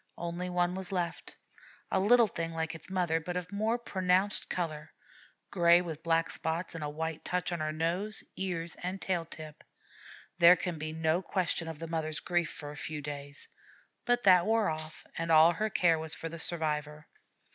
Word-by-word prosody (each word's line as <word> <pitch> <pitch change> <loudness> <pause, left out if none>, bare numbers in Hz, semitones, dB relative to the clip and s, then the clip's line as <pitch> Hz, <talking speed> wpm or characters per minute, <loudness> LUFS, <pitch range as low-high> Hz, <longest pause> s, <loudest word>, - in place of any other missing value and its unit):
Only 175 +1 -4
one 180 0 +1
was 190 0 -5
left, 175 -3 -3 0.6
a - - +3
little 235 +5 +6
thing 165 -4 -4
like 160 0 -2
its 165 +2 -10
mother, 175 -4 +1
but 180 +2 -4
of 180 +1 -5
more 215 +3 0
pronounced 190 -3 +1
color 155 -3 -3 0.6
gray 170 -2 +6
with 165 -3 -5
black 165 0 +1
spots, 165 +2 -2
and 165 -2 -5
a 150 - -2
white 160 +1 -4
touch 180 0 -1
on 155 -2 -2
nose, 180 +7 -1
ears, 170 -3 -3
and 185 +2 -3
tail 175 -4 -1
tip. 155 -2 -10 0.8
There 170 +1 +9
can 180 -3 -4
be 155 +1 -3
no 160 +2 +1
question 180 -3 -1
of 160 -2 -5
the 165 +2 -6
mother's 155 -2 -2
grief 175 0 0
for 145 -1 -7
a - - -9
few 150 0 -4
days; 145 0 -5 0.6
but 245 0 +1
that 180 -2 +6
wore 220 -5 +3
off, 155 0 -7
and 165 0 -1
all 160 +1 +8
her 215 +4 -1
care 170 -5 +3
was 160 0 -2
for 165 - -5
the 165 0 -8
survivor. 150 -2 -1
170 Hz, 185 wpm, -31 LUFS, 160-180 Hz, 0.8 s, There